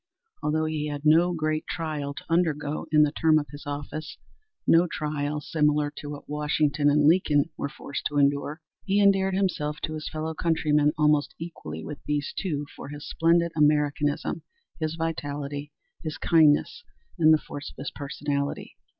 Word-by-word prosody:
Although 155 +1 0
he 155 -1 -2
had 145 0 -5
no 165 +4 +5
great 155 -1 -1
trial 150 -4 -3
to - - -9
undergo 155 -3 0
in 150 -1 +6
the 150 - +2
term 155 0 +3
of 150 - 0
his 145 0 -10
office 145 +2 -5 0.5
no 170 +2 +5
trial 150 -2 -2
similar 150 -1 +1
to 145 - -6
what 145 -1 -8
Washington 150 0 +1
and 145 0 +3
Lincoln 160 -2 +3
were 140 - -3
forced 140 -1 -6
to 145 - -4
endure, 145 +2 +1 0.2
he 200 +1 +1
endeared 195 -1 +4
himself 150 -6 0
to 155 - -3
his 155 -1 -5
fellow 160 +1 -3
countrymen 150 -3 +2
almost 150 -1 +2
equally 80 - -7
with 150 - -8
these 145 -1 -1
two 150 -6 -2
for - - -8
his 145 +1 -8
splendid 170 +1 +2
Americanism, 150 -1 +1 0.4
his 155 0 -2
vitality, 145 -3 -4 0.3
his 155 -1 -5
kindness 160 - +3 0.4
and 160 -1 +6
the 155 - +7
force 145 -1 -8
of - - -18
his 140 - -5
personality. 140 0 -3
150 Hz, 165 wpm, -26 LUFS, 145-160 Hz, 0.5 s, the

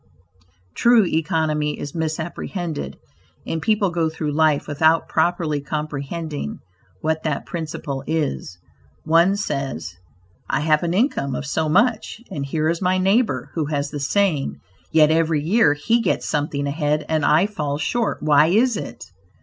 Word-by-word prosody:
True 235 -3 +5
economy 155 -2 0
is 145 - -6
misapprehended, 160 - -4 0.5
and 160 - -3
people 210 0 +1
go 165 -2 0
through 155 -1 -3
life 155 -1 +2
without 160 +2 +2
properly 160 -4 0
comprehending 150 - -4 0.4
what 160 0 0
that 150 -3 -2
principle 150 -5 -5
is. 150 - -2 0.5
One 170 +5 +4
says, 135 - -3 0.6
"I - - +1
have 155 0 +3
an 170 0 -1
income 185 - +1
of 145 - -4
so 155 +2 -1
much, 220 +5 +1
and 145 -7 -3
here 155 +3 -1
is 165 +2 -1
my 185 0 +2
neighbor 200 +6 +1
who 160 -3 -1
has 145 -1 -2
the 145 - -4
same; 160 -1 +1 0.4
yet 155 -1 +5
every 160 -2 +2
year 170 -3 +3
he 230 +11 +1
gets - - -1
something 145 -1 -1
ahead 150 +1 -1
and 155 -1 0
I 155 +6 +4
fall 150 -9 -3
short; 225 +9 -1
why 150 0 +5
is 225 +6 +3
it? - - -7
155 Hz, 150 wpm, -22 LUFS, 145-175 Hz, 0.6 s, True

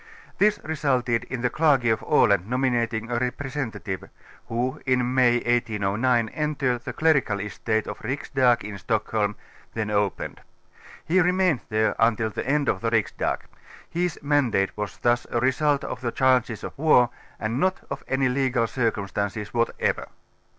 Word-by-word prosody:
This 210 +1 +4
resulted 130 -6 0
in 130 -2 -5
the 125 0 0
Clergy 135 -7 +3
of 110 - 0
Aland 100 0 +3
nominating 120 -3 0
a 120 - +1
representative, 125 -6 -4 0.4
who 125 +5 -2
in 125 -1 +2
May 125 -2 +4
1809 115 0 +1
entered 140 -5 -1
tlu^ - - -6
clerical 140 -10 +2
estate 110 +2 -2
of - - -6
tlif 140 +2 -3
Riksdag 125 -3 +3
in 100 -1 -7
Stockholm, 105 +1 -1 0.4
then 110 -2 -2
opened: 100 -2 -1 0.6
he 180 +4 +3
remaind 180 -4 +2
there 110 0 +2
iiutil 110 -1 +2
the - - -4
end 145 -1 +2
of 95 - 0
the 115 - 0
Riksdag; 115 -2 0 0.5
his 175 0 -2
mandate 130 -10 +1
was 105 -3 -5
thus 120 0 +1
a 120 - 0
result 140 +3 +2
of 125 - -5
the 120 -2 -2
chances 125 -4 +2
of - - -6
war 135 -6 +5 0.3
and 115 +4 -2
not 185 +3 +1
of - - -5
any 130 0 +1
legal 125 -2 +1
circumstances 105 -3 -2
whatever. 115 0 0
120 Hz, 150 wpm, -25 LUFS, 110-135 Hz, 0.6 s, war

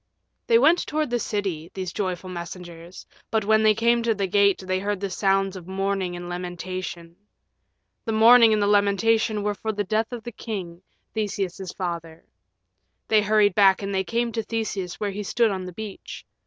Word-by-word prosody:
They 230 - +6
went 315 +8 +4
toward 305 -3 -1
the 240 - +1
city, 190 -8 -3
these 185 -3 -4
joyful 185 -2 -3
messengers, 175 0 -9 0.2
but 220 -2 0
when 220 +1 +4
they 215 -1 +4
came 235 +2 +2
to 230 -1 +1
the 200 -1 -1
gate 200 0 +2
they 185 0 0
heard 205 0 -2
the 200 -1 -4
sounds 195 0 +1
of 180 -2 -9
mourning 190 -1 -2
and 175 0 -7
lamentation. 175 -1 -6 0.9
The 225 - -1
mourning 230 +1 +7
and 215 - +2
the 205 - +2
lamentation 205 +1 +2
were 210 0 0
for 220 +2 -3
the 205 -1 -2
death 215 +4 -1
of 240 -2 -6
the 240 - -6
king, 185 -7 -6 0.3
Theseus's 195 -4 -3
father. 170 -3 -5 0.8
They 215 -1 +5
hurried 210 -1 +3
back 195 0 +4
and 195 0 -3
they 190 0 +1
came 235 +3 -1
to 225 - -2
Theseus 210 -5 -4
where 205 -1 -2
he 205 +2 -5
stood 225 +2 +1
on 190 -1 -4
the 180 - -7
beach. 215 0 -8
200 Hz, 185 wpm, -24 LUFS, 185-220 Hz, 0.9 s, mourning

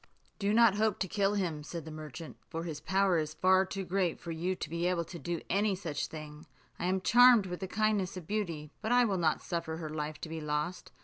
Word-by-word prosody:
"Do 200 0 +1
not 225 -2 +5
hope 215 -2 +2
to 190 - +1
kill 200 +2 +1
him," 170 -7 -1
said 160 +1 -7
the 160 - -7
merchant, 155 +1 -8
"for 165 0 -4
his 160 -4 -5
power 190 -2 +2
is 155 0 -3
far 185 +1 +4
too 195 0 -4
great 180 -1 0
for 170 - -6
you 175 +3 -1
to - - -5
be 170 +2 -1
able 180 -2 +1
to 170 +1 -9
do 170 0 -3
any 200 +1 +2
such 165 -6 -3
thing. 155 0 -9 0.3
I - - -2
am 190 +1 +1
charmed 240 -1 +7
with 180 -1 -5
the 190 - -4
kindness 205 -2 0
of 180 - -7
Beauty, 165 -7 -3
but 220 - -2
I 245 0 +5
will 195 -4 0
not 160 -2 +1
suffer 165 -3 -3
her 160 -2 -5
life 150 0 -4
to - - -4
be 160 0 -5
lost. 150 +4 -3
175 Hz, 240 wpm, -31 LUFS, 160-195 Hz, 0.3 s, charmed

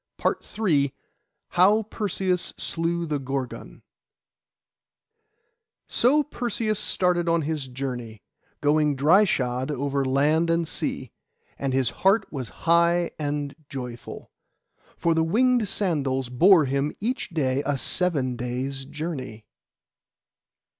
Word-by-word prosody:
PART - - 0
III 145 -11 +2 0.5
HOW 205 +5 +4
PERSEUS 190 -4 -2
SLEW 170 +1 -2
THE 150 -3 -2
GORGON 135 -1 -5 2.0
So 290 +5 +3
Perseus 235 -6 -2
started 175 -2 +1
on 165 -1 +2
his 150 -2 -3
journey, 125 -4 -6 0.4
going 150 0 +3
dry 165 +10 +5
shod 125 -5 -1
over 140 -1 -1
land 150 +5 +2
and 165 0 +1
sea; - - -3 0.5
and 135 -1 -1
his 130 -2 +1
heart 195 +2 +4
was 130 -5 -4 0.2
high 170 +1 +3
and 145 -1 -2
joyful, 125 -4 -7 0.7
for 170 - +2
the 160 0 +2
winged 235 +6 +2
sandals 140 - -1
bore 165 +6 +6
him 140 +2 0
each 245 +4 -2
day 140 -6 0
a 145 -1 0
seven 135 -2 0
days' 130 +3 -4
journey. 140 -7 -6
150 Hz, 115 wpm, -25 LUFS, 135-180 Hz, 2.0 s, bore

